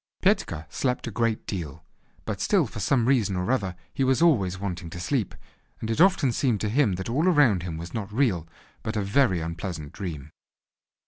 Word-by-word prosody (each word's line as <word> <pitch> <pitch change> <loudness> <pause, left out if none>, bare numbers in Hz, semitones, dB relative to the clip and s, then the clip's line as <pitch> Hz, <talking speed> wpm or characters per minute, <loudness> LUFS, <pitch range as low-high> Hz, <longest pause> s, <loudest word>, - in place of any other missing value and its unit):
Petka 75 - +1
slept 125 +9 -1
a 120 - -4
great 115 +1 0
deal, 85 -8 -5 0.4
but - - -3
still - - +3
for - - -7
some 120 +3 +2
reason 115 -7 +2
or 90 +6 -1
other 100 -8 0 0.2
he 135 - 0
was 130 0 +3
always 105 - +3
wanting 90 -3 -4
to 85 - -7
sleep, 110 +3 -1 0.4
and 110 - -3
it 115 - +1
often 185 -8 +4
seemed 120 -2 +1
to 105 - 0
him 125 -3 +3
that 95 +1 -4
all 145 +10 +1
around 145 - +4
him 85 -2 -5
was 85 +2 -8
not 105 -3 -4
real, 105 - +1 0.3
but 110 0 -3
a 105 - 0
very 100 -3 +2
unpleasant 85 -2 -5
dream. 75 -7 -6
105 Hz, 195 wpm, -26 LUFS, 90-125 Hz, 0.4 s, often